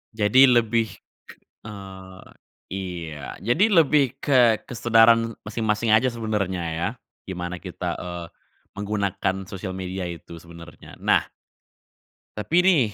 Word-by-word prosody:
Jadi 110 +5 +6
lebih, 115 -2 +3 0.8
k - - -10
eee, 95 -3 -10 0.5
iya 85 -7 -6
jadi 120 - +3 0.2
lebih 140 -3 +1
ke 120 -6 +4
kesadaran 115 -1 +4
masing-masing 110 +1 -1
aja 110 +4 +5
sebenernya 105 -6 -2
ya? 85 +3 -1 0.4
Gimana 90 -1 -5
kita, - - -5
eee, 90 -1 -6 0.5
menggunakan 100 -2 -1
sosial 95 -1 -6
media 95 0 -4
itu 85 0 -8
sebenernya 85 0 -13
nah. - - +2 1.1
Tapi 160 +12 +2
nih, 155 - +3
105 Hz, 110 wpm, -24 LUFS, 90-115 Hz, 1.1 s, Jadi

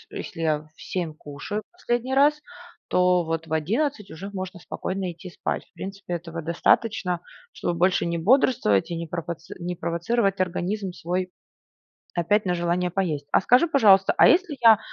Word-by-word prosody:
если 165 - -7
я 155 -2 +2 0.2
в - - -14
7 170 -4 -3
кушаю 150 +9 -6
последний 255 -7 -2
раз, 295 +2 +4 0.5
то 180 -1 +3
вот 165 0 -3
в 160 - -8
11 210 - -1
уже 190 +5 -7
можно 185 -1 -5
спокойно 185 +1 -4
идти 175 +2 -11
спать. - - -3
В - - -36
принципе, 195 -2 -6
этого 165 -1 -5
достаточно, 180 +2 +1 0.3
чтобы 175 - -2
больше 180 0 +2
не 170 0 -1
бодрствовать 200 - +3
и 170 - -2
не 165 0 -4
пропоци 170 0 -6
не 175 +1 -4
провоцировать 195 +4 0
организм 185 +2 -1
свой 180 +2 -3 0.8
опять 205 +5 +1
на 180 - +1
желание 175 +1 0
поесть. 165 -6 -2
А - - +4
скажи, 250 - +4
пожалуйста, 200 -10 +5
а - - +7
если 345 -4 +3
я, 225 -2 +8
180 Hz, 165 wpm, -25 LUFS, 170-210 Hz, 0.8 s, я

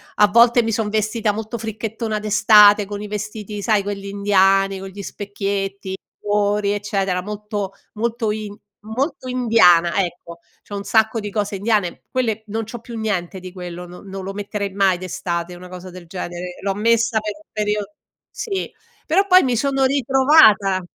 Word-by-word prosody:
A 210 - +5
volte 235 +3 +5
mi 225 - -1
son 220 -1 -1
vestita 215 0 0
molto 220 +2 -5
fricchettona 220 0 -4
d'estate, 210 -1 +6
con 205 +1 -6
i 210 - -6
vestiti 210 0 -5
sai, 210 0 +2
quelli 200 0 -5
indiani, 195 -1 +2
con 195 - -7
gli 200 +1 -9
specchietti, 195 -1 -4 0.2
cuori, 205 0 +1
eccetera, 195 -3 -1
molto 205 0 -5 0.2
molto 225 0 -1
in 210 -1 -5 0.3
molto 255 +5 -3
indiana 220 -9 +4
ecco, 170 -1 -8 0.3
c'ho 205 - -6
un 200 - -4
sacco 220 +1 +2
di 210 -1 -5
cose 205 -1 -2
indiane. 205 -3 0
Quelle 225 -4 -1
non 220 +2 -3
c'ho 225 +2 -8
più 230 +1 -9
niente 195 -4 -2
di 185 0 -9
quello, 180 -1 -7
non 180 +3 -12
non 195 0 -6
lo 195 +1 -5
metterei 200 0 -4
mai 195 -2 +3
d'estate 175 -1 -4
una 180 +1 -11
cosa 180 0 -9
del 180 -1 -12
genere, 180 0 -6
l'ho 195 0 -1
messa 230 +2 +2
per 210 -1 -4
un 210 0 -20
periodo 210 -1 -2 0.4
sì, 390 -4 -4 0.3
però 385 +6 +2
poi 370 -1 +7
mi 250 -2 +1
sono 270 +2 +1
ritrovata. 260 -7 +4
205 Hz, 170 wpm, -20 LUFS, 195-220 Hz, 0.4 s, poi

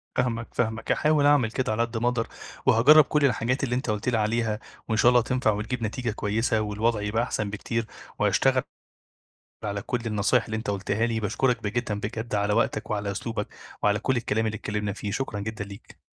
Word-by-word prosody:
فاهمك، 115 -2 0
فاهمك. 110 -1 -1
هاحاول 150 -1 +3
أعمل 145 -6 +4
كده 130 -1 -1
على 110 +2 0
قد 115 -1 -1
ما 120 +2 0
أقدَر، 120 -2 0 0.4
وهاجرّب 135 +5 +7
كل 150 0 +2
الحاجات 125 +1 +1
اللي 125 -2 0
أنت 125 -1 -2
قُلت 105 +3 0
لي 120 - +1
عليها، 110 0 0 0.3
وإن 110 -1 0
شاء 120 - +6
الله 125 -1 +5
تنفَع 125 -2 +1
وتجيب 110 +4 -3
نتيجة 115 +2 -2
كويّسة، 110 +2 0
والوضع 105 +1 0
يبقى 110 +3 0
أحسن 105 -4 -2
بكتير، 115 +2 -3 0.3
وهاشتغل - - +3 1.0
على 100 -1 -2
كل 125 - -2
النصايح 110 +3 +2
اللي 110 -1 -4
أنت 110 -2 -3
قُلتها 100 +3 0
لي. 115 -1 -1
باشكرك 115 +3 0
ب - - -3
جدًا 110 0 -1
بجد 110 +1 -4
على 100 0 +1
وقتك 110 - 0
وعلى 105 -1 -1
أسلوبك 110 +1 -3 0.3
وعلى 105 0 +3
كل 130 +4 0
الكلام 110 -2 0
اللي 110 0 -2
اتكلّمنا 105 -1 -3
فيه. 105 0 -5
شكرًا 110 -3 -3
جدًا 110 0 -4
ليك. 100 +2 -13
110 Hz, 195 wpm, -26 LUFS, 105-120 Hz, 1.0 s, وهاجرّب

